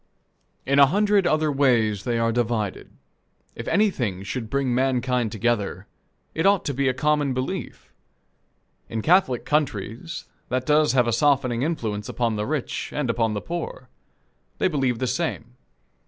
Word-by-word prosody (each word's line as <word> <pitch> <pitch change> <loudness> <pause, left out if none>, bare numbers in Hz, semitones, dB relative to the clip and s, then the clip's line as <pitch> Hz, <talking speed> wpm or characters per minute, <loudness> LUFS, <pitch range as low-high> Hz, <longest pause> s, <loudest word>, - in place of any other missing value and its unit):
In 140 +1 +3
a 140 - +8
hundred 205 +3 +2
other 155 -2 +2
ways 115 -8 +2
they 120 -2 0
are 115 0 +1
divided. 115 -4 -2 0.6
If 115 - -8
anything 125 - +1
should 110 +2 -4
bring 135 -1 0
mankind 125 -2 +1
together 105 -4 -1 0.5
it 165 +4 +1
ought 200 -1 +3
to 140 - -1
be 135 +1 0
a 130 - +2
common 145 -1 +1
belief. 130 +9 -5 1.0
In 110 -1 -3
Catholic 160 -8 +3
countries, 145 - -2 0.2
that 130 0 -1
does 150 0 +3
have 125 -2 +4
a 115 - 0
softening 130 -2 +2
influence 110 -9 -2
upon 115 -2 -1
the 105 0 -2
rich 150 -3 -3
and 145 -5 -1
upon 115 -2 0
the 105 - -3
poor. 175 - -6 0.7
They - - +2
believe 135 -8 0
the 130 - -1
same. 125 -3 -3
130 Hz, 155 wpm, -24 LUFS, 115-150 Hz, 1.0 s, a